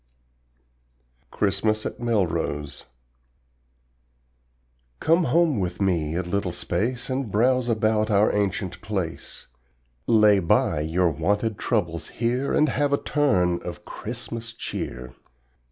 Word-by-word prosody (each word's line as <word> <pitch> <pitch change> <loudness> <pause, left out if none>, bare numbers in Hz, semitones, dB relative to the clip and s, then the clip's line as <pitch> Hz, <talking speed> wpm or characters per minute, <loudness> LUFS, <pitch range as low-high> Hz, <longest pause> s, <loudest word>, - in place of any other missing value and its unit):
CHRISTMAS 110 +2 0
AT - - -5
MELROSE 85 -11 -1 2.1
Come 165 +2 +3
home 155 -2 +3
with 90 -2 -3
me 85 -5 0
a 90 - 0
little 90 +1 -1
space 115 +10 -2
And 130 -2 -2
browse 125 +3 +2
about 110 -1 +1
our 105 0 +3
ancient 100 -2 -1
place, 95 -6 -4 0.6
Lay 105 -3 +5
by 85 -3 +2
your 85 +3 +1
wonted 100 +8 -1
troubles 85 -9 -1
here 125 +3 -1
And 155 - +3
have 145 +2 0
a 140 - +3
turn 90 - +1
of - - -8
Christmas 115 0 -6
cheer. 60 - -5
105 Hz, 110 wpm, -24 LUFS, 90-120 Hz, 2.1 s, Lay